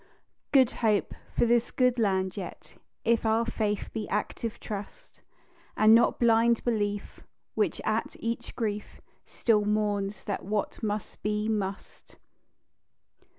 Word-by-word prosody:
"Good 260 -4 +5
Hope" 215 -3 +2 0.2
for - - +4
this 235 0 +3
good 250 -1 +2
land 190 -3 +1
yet, 190 -4 -8 0.3
If 230 0 +3
our 225 +1 +2
faith 210 -3 -2
be 215 -2 -4
active 215 +2 -3
trust, 210 - -8 0.6
And 215 +1 +7
not 230 +1 +4
blind 230 0 +4
belief, 205 -3 -2 0.3
which, - - 0
at - - -1
each 235 +1 -4
grief, 210 -3 -3 0.3
Still 215 -3 +2
mourns 205 -1 -1
that 200 - -3
what 205 +1 -2
must 210 -2 -3
be, 210 0 -1
must. 200 -3 -4
215 Hz, 125 wpm, -28 LUFS, 205-230 Hz, 0.6 s, And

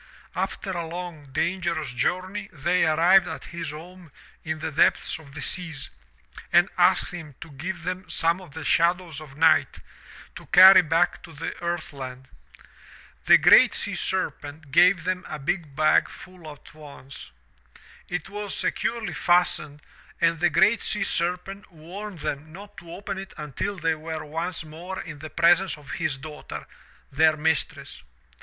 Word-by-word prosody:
After 195 - -3
a 170 -3 -4
long, 170 -3 -7
dangerous 165 -2 -2
journey 185 +10 -2
they 175 +3 +1
arrived 175 +4 +5
at 160 -4 -7
his 170 -2 -4
home 170 +2 -11 0.3
in 160 0 -3
the 155 +1 -4
depths 150 - +2
of 145 -3 -15
the 150 - -6
seas 165 -7 -3 0.6
and - - +5
asked - - +3
him 160 -6 -9
to 165 - -11
give 170 +5 -6
them 180 0 -5
some 170 +2 0
of 180 - -13
the 160 - -6
shadows 170 -1 +1
of 145 -3 -13
night 160 0 +3 0.6
to - - -11
carry 185 0 +9
back 165 +2 +1
to 165 - -13
the 155 +2 -5
earth 170 -2 -3
land. 130 -1 -8 1.0
The - - +8
GREAT - - +6
SEA - - +1
SERPENT 145 0 -3
gave 180 +3 +5
them 185 +1 -2
a - - -5
big 150 0 -3
bag 155 +1 +3
full 180 -4 -12
at 145 - -15
once. 140 - -12 0.8
It 175 -1 -4
was 205 0 -5
securely 225 -6 -2
fastened 165 -3 +1 0.4
and 165 -1 +2
the 175 +1 +3
GREAT 200 +7 +3
SEA 210 - +1
SERPENT 180 +4 -2
warned 180 +3 -9
them 150 +3 -4
not 200 +4 -12
to 170 - -11
open 195 +1 -6
it 195 0 -10
until 150 +7 -4
they 165 -1 0
were 155 0 -6
once 165 +4 -4
more 170 +5 -8
in 155 -3 -8
the 155 +1 -8
presence 175 +2 +3
of 145 -2 -12
his 160 -6 -2
daughter, 150 +2 -9 0.5
their 155 +2 +3
mistress. 155 -3 -2
165 Hz, 160 wpm, -25 LUFS, 155-180 Hz, 1.0 s, carry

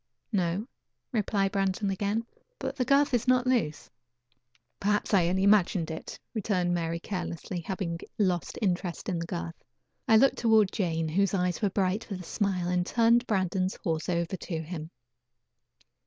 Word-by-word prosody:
"No," 185 0 0 0.5
replied 200 -4 +1
Brandon 195 0 0
again. 205 +4 -1 0.3
"But - - -4
the 255 -3 0
girth 280 +1 +3
is 245 +1 +1
not 255 0 +4
loose." 155 - 0 0.9
"Perhaps 205 +1 0
I 180 -4 +5
only 190 +2 +1
imagined 190 -5 +3
it," 160 - -7
returned 185 -5 0
Mary 170 -1 -1
carelessly, 180 -1 -4
having 170 -1 -3 0.2
lost 185 -5 0
interest 180 -2 -1
in 175 -3 -1
the 165 - -4
girth. 85 - -5 0.4
I 220 - +7
looked 270 +4 +4
toward 220 -4 +4
Jane, 165 -4 -1
whose 195 +4 +2
eyes 180 0 0
were 205 - +2
bright 195 +3 -1
with 190 -3 -4
a - - -8
smile, 185 -2 -1
and 180 0 +1
turned 235 +4 +3
Brandon's 185 -2 0
horse 160 -1 -1
over 170 +1 0
to 165 -2 -4
him. 160 -1 -6
190 Hz, 155 wpm, -28 LUFS, 170-210 Hz, 0.9 s, I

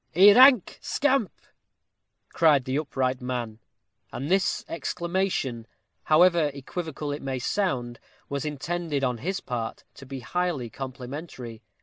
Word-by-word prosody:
"A 200 +4 +9
rank 255 -3 +6
scamp!" 270 - +1 1.0
cried 150 -6 +3
the 130 - -2
upright 130 -4 -1
man; 120 -3 -4 0.5
and 135 +8 -4
this 190 0 +1
exclamation, 170 -7 -2 0.4
however 170 -1 +5
equivocal 150 +1 -5
it 145 - -4
may 135 -1 -3
sound, 125 -6 -1 0.3
was 140 +1 -3
intended, 150 0 -3
on 125 -3 0
his 190 - -3
part, 115 -3 -4
to 135 - -13
be 135 -1 -6
highly 155 -4 -2
complimentary. 130 -2 -7
145 Hz, 120 wpm, -26 LUFS, 125-175 Hz, 1.0 s, A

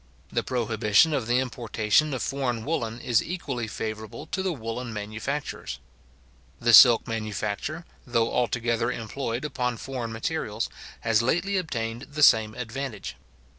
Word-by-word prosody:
The - - +1
prohibition 115 +3 +2
of 130 -6 -1
the 120 +1 +3
importation 120 +2 +1
of 130 - -3
foreign 125 -5 -2
woollen 120 -7 -2
is 120 -2 +2
equally 135 -10 -4
favourable 110 +1 -5
to 190 - -3
the 190 -1 0
woollen 120 -3 -5
manufacturers. 110 +7 -4 0.8
The 120 0 +3
silk 120 0 +9
manufacture, 110 - -3 0.2
though 115 -1 +1
altogether 120 -1 +1
employed 115 +2 -4
upon 125 -5 -2
foreign 125 -2 -5
materials, 115 -2 -2 0.3
has 115 -1 +3
lately 175 +11 +1
obtained 120 -9 -3
the 150 0 +1
same 110 -5 +6
advantage. 125 -3 -5
120 Hz, 135 wpm, -26 LUFS, 110-135 Hz, 0.8 s, silk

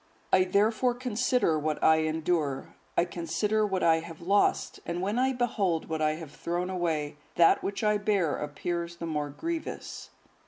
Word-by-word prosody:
I 185 0 +6
therefore 220 +6 +2
consider 245 -8 +1
what 155 0 -2
I 160 0 +6
endure, 155 -3 -1 0.2
I 170 - +4
consider 180 +6 0
what 190 -2 -1
I 165 -1 +5
have 165 -1 -9
lost, 200 +4 +1
and 170 +1 -3
when 205 +6 -1
I 260 +1 +3
behold 210 -11 0
what 160 -1 -2
I 155 0 +2
have 155 -2 -8
thrown 175 +4 -3
away, 155 -5 -1 0.2
that 170 -1 +5
which 200 +2 -3
I 210 -1 +3
bear 200 -7 +1
appears 170 +4 -4
the 170 - -6
more 150 -3 -2
grievous." 330 - -5
175 Hz, 165 wpm, -28 LUFS, 160-210 Hz, 0.2 s, I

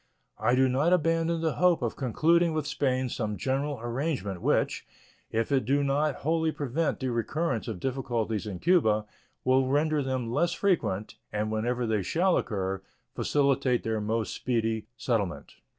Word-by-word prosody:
I 115 +3 +3
do 130 +1 +4
not 140 +7 +2
abandon 165 -1 +1
the 160 -2 -1
hope 180 -6 +3
of 115 - -1
concluding 165 +7 +2
with 155 -2 -1
Spain 130 -3 0
some 110 -3 -3
general 135 0 -1
arrangement 120 - -2
which, - - +1 0.5
if 115 +4 -1
it 135 -2 +3
do 140 +4 +2
not 140 +1 +1
wholly 160 0 +2
prevent 150 +2 -1
the 130 -2 -1
recurrence 120 +2 -1
of 110 -6 -4
difficulties 120 -4 -2
in 95 -3 -4
Cuba, 110 - +3 0.4
will 130 0 +3
render 150 +2 +2
them 130 -3 -2
less 170 +5 +2
frequent, 130 - 0
and, 105 +1 -1
whenever 120 +3 -1
they 110 -2 +1
shall 175 - +2
occur, 95 -2 -2 0.3
facilitate 140 -3 +1
their 110 -1 -1
more 110 +1 0
speedy 115 -3 -1
settlement. 115 -8 -2
130 Hz, 155 wpm, -28 LUFS, 110-150 Hz, 0.5 s, do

